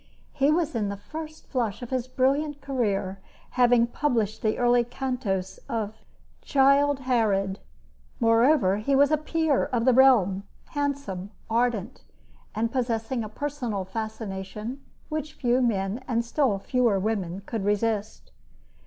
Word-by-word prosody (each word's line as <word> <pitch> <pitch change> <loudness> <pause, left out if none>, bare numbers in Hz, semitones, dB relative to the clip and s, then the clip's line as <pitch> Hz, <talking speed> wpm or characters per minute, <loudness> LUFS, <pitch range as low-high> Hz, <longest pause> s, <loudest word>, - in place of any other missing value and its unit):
He 280 -1 +2
was 320 -1 +1
in 215 -4 -1
the 200 - -4
first 310 +8 -8
flush 240 -4 -2
of 245 - -8
his 255 -1 -1
brilliant 280 +3 +1
career, 210 -8 -1 0.3
having 245 -1 +4
published 235 -5 -1
the 215 -1 0
early 245 0 +4
cantos 235 -7 -3
of 220 -2 -2 0.5
"Childe 275 0 +3
Harold." 210 -6 +1 0.6
Moreover, 230 -3 +4
he 245 +6 +1
was 285 +2 +5
a 310 - +4
peer 310 -1 +1
of 240 -2 -1
the 255 - +5
realm, 230 -8 +5 0.3
handsome, 280 -10 -3 0.2
ardent, 235 -1 0 0.5
and 225 +2 0
possessing 235 -1 -1
a 215 - -6
personal 245 -6 -3
fascination 215 +3 -5 0.3
which 305 -1 -4
few 245 +1 +1
men 215 0 0
and 235 -2 0
still 245 -4 +1
fewer 235 0 +1
women 195 -3 -2
could 225 -3 -3
resist. 210 +1 -1
235 Hz, 135 wpm, -26 LUFS, 210-270 Hz, 0.6 s, was